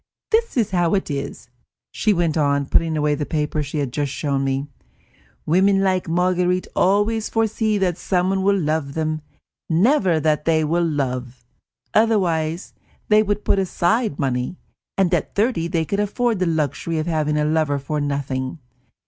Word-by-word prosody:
"This 455 - +1
is 225 -5 +1
how 175 -1 +2
it 190 -5 -2
is," 140 -3 -5 0.4
she 215 - +1
went 170 -5 +1
on, 140 -2 +1
putting 160 +3 +1
away 150 0 +1
the 150 - -2
papers 150 -1 -1
she 150 - -4
had 140 -4 -2
just 145 -2 -1
shown 140 -2 -1
me; 135 +1 -1 0.8
"women 195 +4 +3
like 185 -3 0
Marguerite 180 +1 +1
always 205 +4 +2
foresee 220 -1 0
that 185 -3 0
someone 190 +1 0
will 200 +1 +2
love 155 -3 -1
them, 155 -1 -1 0.5
never 185 - +3
that 150 -1 0
they 160 -1 +3
will 170 +3 +1
love; 130 -4 -3 0.5
otherwise 180 -7 +1 0.4
they 215 0 +6
would 205 -1 -2
put 195 - +2
aside 190 - 0
money, 130 +3 -2 0.4
and 190 -2 +2
at 170 - -1
thirty 205 -6 +1
they 165 -1 -1
could 200 +5 -2
afford 220 +1 0
the 185 - +1
luxury 160 +1 -1
of 155 - -1
having 155 -3 0
a 150 - +1
lover 155 -2 +1
for 145 +2 -3
nothing. 140 -1 -2
165 Hz, 165 wpm, -21 LUFS, 150-195 Hz, 0.8 s, they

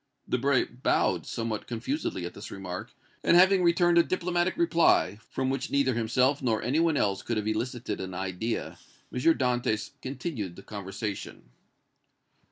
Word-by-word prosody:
Debray 130 +1 +2
bowed 125 +2 0
somewhat 115 -2 -3
confusedly 120 - -3
at 85 - -6
this 100 - -9
remark, 90 -2 -6 0.3
and 170 - +5
having 190 +1 +6
returned 175 0 +4
a - - +6
diplomatic 175 0 0
reply, 165 - +3
from 130 0 -1
which 135 -1 -2
neither 140 -2 +2
himself 125 +5 +2
nor 115 -4 +1
any 130 +7 +1
one 165 -3 +3
else 100 -5 +1
could 115 - -2
have 105 - -1
elicited 120 +3 -2
an 95 -1 -5
idea, 95 +5 -3 0.3
M. - - -2
Dantès 125 -7 +1
continued 130 - -4
the 100 - -12
conversation. 100 - -6
125 Hz, 150 wpm, -28 LUFS, 105-145 Hz, 0.3 s, having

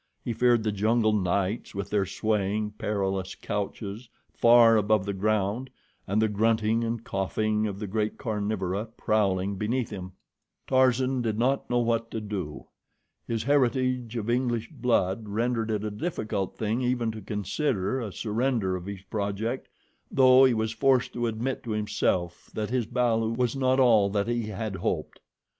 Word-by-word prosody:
He 120 - -2
feared 120 0 +3
the 110 - 0
jungle 110 +2 +2
nights 100 +2 -1
with 100 0 -4
their 100 -2 +1
swaying, 105 0 -1
perilous 95 -2 -2
couches 105 +2 -5 0.2
far 115 -1 +6
above 105 -2 +2
the 100 - -2
ground, 105 +5 0 0.4
and 100 +3 +1
the 110 - +3
grunting 110 +2 +1
and 115 0 -2
coughing 105 +2 -1
of 100 -2 -5
the 105 - -4
great 105 +2 -2
carnivora 105 -4 -2
prowling 100 -2 +1
beneath 115 +4 -1
him. 95 -2 -7 0.5
Tarzan 130 0 +2
did 110 -3 -1
not 130 +4 +1
know 120 - +1
what 115 -1 0
to 110 - -4
do. 100 -8 -5 0.6
His 115 -2 -1
heritage 130 -3 +1
of 115 -2 -3
English 120 -2 0
blood 110 -3 0
rendered 115 +1 0
it 105 -1 -1
a 105 - -2
difficult 105 - -3
thing 110 +3 -1
even 125 -2 0
to 110 0 -8
consider 105 - -1
a 110 -4 -4
surrender 110 -2 0
of 90 0 -6
his 100 -2 -7
project, 105 +5 -3 0.4
though 130 0 +6
he 130 -3 +3
was 110 0 -1
forced 130 +2 +2
to 120 -1 -1
admit 115 +4 -2
to 120 - -9
himself 95 -4 -1
that 110 0 -3
his 125 -4 0
balu 115 -2 +1
was 125 0 +1
not 130 -1 +2
all 110 -6 +5
that 100 +1 0
he 120 -2 -1
had 105 -1 -4
hoped. - - -3
110 Hz, 160 wpm, -27 LUFS, 100-120 Hz, 0.6 s, far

